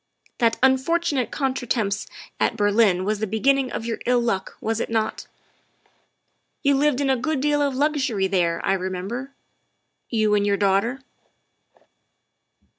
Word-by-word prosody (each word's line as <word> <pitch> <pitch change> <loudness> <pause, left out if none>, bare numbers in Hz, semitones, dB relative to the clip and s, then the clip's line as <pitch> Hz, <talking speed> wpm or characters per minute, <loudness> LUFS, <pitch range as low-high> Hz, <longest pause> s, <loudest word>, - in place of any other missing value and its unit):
That 230 -2 +2
unfortunate 265 -1 +2
contretemps 240 -7 -1 0.3
at 230 - +1
Berlin 205 -3 +3
was 210 0 -1
the 220 - -1
be 220 +3 -3
ginning 275 +1 +2
of 225 - -4
your 230 -1 -3
ill 250 0 +4
luck, 215 -5 -2
was 225 0 -2
it - - -3
not? 225 -1 -2 1.4
You 280 -1 +4
lived 285 -1 +2
in 275 - +1
a - - +3
good 285 +4 -1
deal 290 +1 +1
of 280 -2 0
luxury 275 -8 0
there, 175 -3 0
I - - +2
remember 190 +7 -4 0.8
you 215 -3 +1
and 205 -1 +3
your 200 -1 +1
daughter. 205 +7 +1
230 Hz, 145 wpm, -23 LUFS, 205-270 Hz, 1.4 s, ill